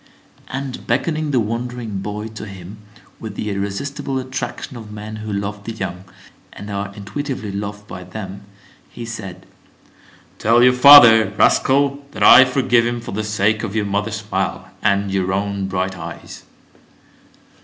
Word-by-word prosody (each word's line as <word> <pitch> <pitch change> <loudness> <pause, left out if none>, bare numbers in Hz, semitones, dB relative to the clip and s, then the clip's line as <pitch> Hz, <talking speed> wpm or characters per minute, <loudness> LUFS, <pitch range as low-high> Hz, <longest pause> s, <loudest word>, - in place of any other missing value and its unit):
And 135 -1 -6
beckoning 155 -2 0
the 135 -3 +2
wondering 115 -1 -4
boy 105 +2 -5
to 110 0 -9
him 95 +1 -10 0.4
with 110 -3 -7
the 105 0 -3
irresistible 100 +8 -3
attraction 130 -1 -5
of 110 -3 -10
men 105 +1 -7
who 110 0 -6
love 100 0 -4
the 115 - -5
young, 95 -3 -6 0.5
and 105 +1 -9
are 100 0 -4
intuitively 110 +1 -5
loved 100 +1 -6
by 90 - -8
them, 95 +1 -8 0.5
he 120 - -8
said: 105 -5 -8 0.9
"Tell 115 +2 +4
your 125 0 +6
father, 120 -6 +8
rascal, 140 +1 +3
that - - -2
I 130 - +9
forgive 125 -2 +2
him 120 0 -2
for 120 +1 -8
the 110 +2 -3
sake 110 0 0
of 100 - -5
your 110 -2 0
mother's 105 +2 -2
smile, 95 -2 -3
and 100 -1 +1
your 95 -1 0
own 100 0 -2
bright 95 0 -2
eyes." 85 -1 -9
105 Hz, 155 wpm, -19 LUFS, 100-120 Hz, 0.9 s, I